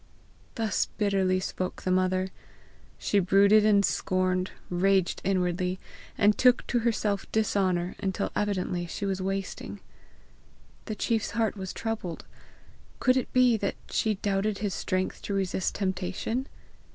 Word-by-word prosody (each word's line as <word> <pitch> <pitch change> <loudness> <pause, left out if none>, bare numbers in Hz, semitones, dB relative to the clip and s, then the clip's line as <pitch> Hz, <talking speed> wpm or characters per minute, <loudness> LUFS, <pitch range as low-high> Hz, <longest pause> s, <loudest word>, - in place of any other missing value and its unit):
Thus 220 -4 0
bitterly 195 -3 +2
spoke 185 0 -4
the 185 - 0
mother. 185 0 +1 0.7
She 205 - +1
brooded 200 +3 +5
and 205 -2 +5
scorned, 185 0 0 0.2
raged 190 0 +2
inwardly, 180 -1 0 0.4
and 205 +1 +4
took 250 -1 +4
to 240 - +1
herself 215 -3 -1
dishonour, 190 -5 +1
until 195 0 -2
evidently 185 -4 -1
she 200 - -4
was 190 -1 -1
wasting. 195 0 -4 1.1
The 215 - -4
chief's 225 +1 0
heart 225 -3 +1
was 190 -2 -5
troubled; 220 -7 -4 0.7
could 255 - +4
it 260 - -1
be 250 -2 +4
that 200 -2 -2 0.2
she 215 -1 +1
doubted 200 +1 -1
his 205 -3 -2
strength 185 0 -2
to 200 - -3
resist 190 -1 -1
temptation? 190 +6 -2
195 Hz, 130 wpm, -28 LUFS, 185-215 Hz, 1.1 s, brooded